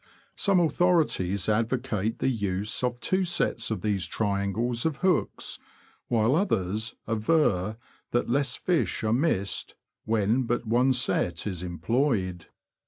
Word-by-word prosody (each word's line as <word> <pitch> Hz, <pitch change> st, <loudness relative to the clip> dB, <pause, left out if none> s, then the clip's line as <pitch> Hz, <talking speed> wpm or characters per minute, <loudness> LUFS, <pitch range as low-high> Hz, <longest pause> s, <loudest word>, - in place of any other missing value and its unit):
Some 200 Hz, -2 st, +3 dB
authori 175 Hz, 0 st, +3 dB
ties 95 Hz, +2 st, -1 dB
advocate 115 Hz, -1 st, 0 dB
the -, -, -1 dB
use 105 Hz, -2 st, -1 dB
of 120 Hz, -1 st, -1 dB
two 185 Hz, +9 st, +1 dB
sets 175 Hz, -1 st, 0 dB
of 110 Hz, -5 st, -2 dB
these 100 Hz, -4 st, 0 dB
triangles 105 Hz, +5 st, -1 dB
of 160 Hz, -4 st, -1 dB
hooks, 180 Hz, -4 st, 0 dB, 0.5 s
while 115 Hz, +2 st, +2 dB
others 110 Hz, -, 0 dB
aver 110 Hz, -, +1 dB, 0.3 s
that 120 Hz, -, 0 dB
less 135 Hz, +1 st, +1 dB
fish 175 Hz, -9 st, 0 dB
are 110 Hz, 0 st, +2 dB
missed 120 Hz, -, 0 dB, 0.3 s
when 110 Hz, +3 st, +1 dB
but 120 Hz, +1 st, -1 dB
one 120 Hz, +4 st, +3 dB
set 95 Hz, -9 st, 0 dB
is 95 Hz, -5 st, -3 dB
employed. 90 Hz, -, -1 dB
115 Hz, 130 wpm, -27 LUFS, 100-130 Hz, 0.5 s, Some